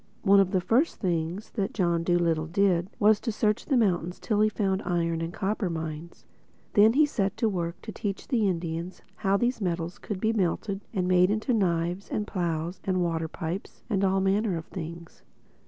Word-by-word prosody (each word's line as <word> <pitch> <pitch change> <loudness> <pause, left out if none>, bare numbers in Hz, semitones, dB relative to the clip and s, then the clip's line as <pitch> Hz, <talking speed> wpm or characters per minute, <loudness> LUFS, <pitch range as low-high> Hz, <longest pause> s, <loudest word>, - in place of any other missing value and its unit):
One 200 -1 +6
of 195 -2 +4
the 185 -2 +1
first 250 - +2
things 175 +1 -2
that 200 -4 -2
John 170 -4 +1
Dolittle 170 -2 +1
did 180 0 +2
was 215 -2 +4
to 230 - -2
search 210 0 0
the 275 - +3
mountains 180 -5 +1
till 210 -2 0
he 215 - +4
found 195 -2 0
iron 170 -3 -1
and 165 0 -3
copper 200 +1 -1
mines. 160 0 -6 0.5
Then 215 +1 +6
he 300 +4 +5
set 205 -8 -1
to 225 - +2
work 170 -4 -2
to 220 - -6
teach 200 -2 -4
the 230 -6 +2
Indians 170 0 -3
how 200 -1 +2
these 240 +1 0
metals 170 -1 -2
could 205 -3 -5
be 220 +3 +1
melted 195 0 -1
and 185 -4 -1
made 180 0 +4
into 220 +5 0
knives 175 -2 0
and 210 - -1
plows 170 -2 -2
and 185 -2 +1
water 165 -1 -1
pipes 170 +4 -6
and 195 -1 +1
all 190 0 +2
manner 195 -1 +1
of 165 - -6
things. 170 -1 -8
190 Hz, 190 wpm, -27 LUFS, 170-210 Hz, 0.5 s, One